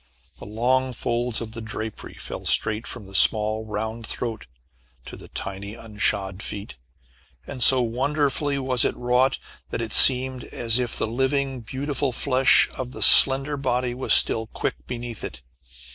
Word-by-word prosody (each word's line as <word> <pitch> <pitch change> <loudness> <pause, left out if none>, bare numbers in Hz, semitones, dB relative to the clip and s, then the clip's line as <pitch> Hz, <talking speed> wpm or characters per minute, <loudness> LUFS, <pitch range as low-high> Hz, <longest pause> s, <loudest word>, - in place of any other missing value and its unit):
The - - -11
long 125 +4 -1
folds 120 0 -3
of 110 -1 -7
the 115 0 -8
drapery 110 0 -8
fell - - -8
straight 110 +2 +2
from 120 -5 -6
the 95 - -14
small, 110 +2 +3
round 110 +1 -5
throat 115 - -6 0.6
to - - -10
the - - -13
tiny 100 +2 -7
unshod 105 -3 -3
feet, 100 0 -7 0.7
and 130 -3 -9
so 125 +1 +6
wonderfully 140 +4 -1
was 130 -3 0
it - - -1
wrought, 125 +2 +1 0.3
that - - -5
it 115 -2 -5
seemed 130 -1 +5
as 115 0 -1
if 120 -2 -2
the - - 0
living 135 +3 -2
beautiful 135 +3 -3
flesh 130 +2 +3
of 125 -1 -7
the - - -1
slender 135 +2 +6
body 125 -2 -2
was 130 +2 -5
still 110 0 +5
quick - - -6
beneath 120 -2 -7
it. 60 -1 -8
120 Hz, 160 wpm, -23 LUFS, 110-130 Hz, 0.7 s, so